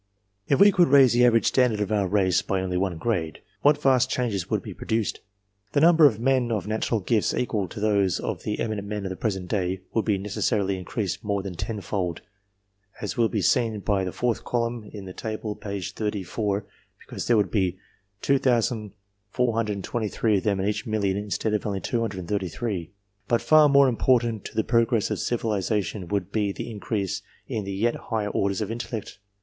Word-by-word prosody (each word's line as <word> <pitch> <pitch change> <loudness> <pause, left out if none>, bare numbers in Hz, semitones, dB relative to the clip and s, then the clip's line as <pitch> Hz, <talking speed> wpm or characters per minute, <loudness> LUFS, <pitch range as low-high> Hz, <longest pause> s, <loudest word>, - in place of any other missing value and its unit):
If 140 - +2
we 205 +1 +8
could 180 -2 +4
raise 135 -3 +6
the 120 +1 +4
average 115 -1 +3
standard 125 -5 +3
of 105 0 -1
our 100 -3 +1
race 95 -1 +2
only 95 -2 -1
one 90 -2 0
grade, 85 -6 -2 0.2
what 145 +1 +4
vast 130 -1 +3
changes 110 -8 -1
would - - 0
be - - -7
produced! 110 -1 -2 0.5
The - - +3
number 160 -1 +7
of 110 -6 -1
men 125 -1 +2
of 110 -3 -1
natural 110 +1 -1
gifts 110 +2 +1
equal 105 -6 -1
to 95 - -8
those 100 -3 +2
of - - -4
the 105 - -3
eminent 105 -3 -2
men 105 -1 -4
of 95 - -3
the - - -4
present 95 -3 -2
day, 95 -1 -1
would 115 - +1
be 105 -3 +2
necessarily 100 0 -1
increased 95 0 -3
more 100 -2 -1
than 95 -2 -5
tenfold, 95 -3 -3 0.8
as 105 - -4
will 115 -2 +2
be 105 -4 -1
seen 115 -1 +2
by 100 -1 +1
the 90 - -3
fourth 120 +2 -1
columiv 115 -3 -2
of 100 - -8
the 95 - -8
table 110 0 -4
p. 100 -1 -5
30, 105 +2 -3 0.8
because - - -7
there 120 - +4
would 105 -2 +1
be 95 -4 0 0.5
2,423 110 -2 0
of - - -10
them 100 -3 +1
in 95 - 0
each 105 +2 -2
million 100 -3 0
instead 105 +1 -2
of 105 - 0
only 100 -2 -2
233; 100 -3 -3 0.4
but 120 - +2
far 155 -1 +6
more 140 0 +6
important 120 -3 +2
to - - -8
the 110 - +2
progress 115 -1 +2
of - - -1
civilization 105 -4 -1
would 100 0 -2
be 105 -2 0
the 115 - -6
increase 100 -2 -3 0.3
in 110 -6 -3
the 100 - -4
yet 115 +4 +1
higher 110 -3 -3
orders 100 0 0
of 105 0 -2
intellect. 115 -3 -5
105 Hz, 185 wpm, -25 LUFS, 100-115 Hz, 0.8 s, we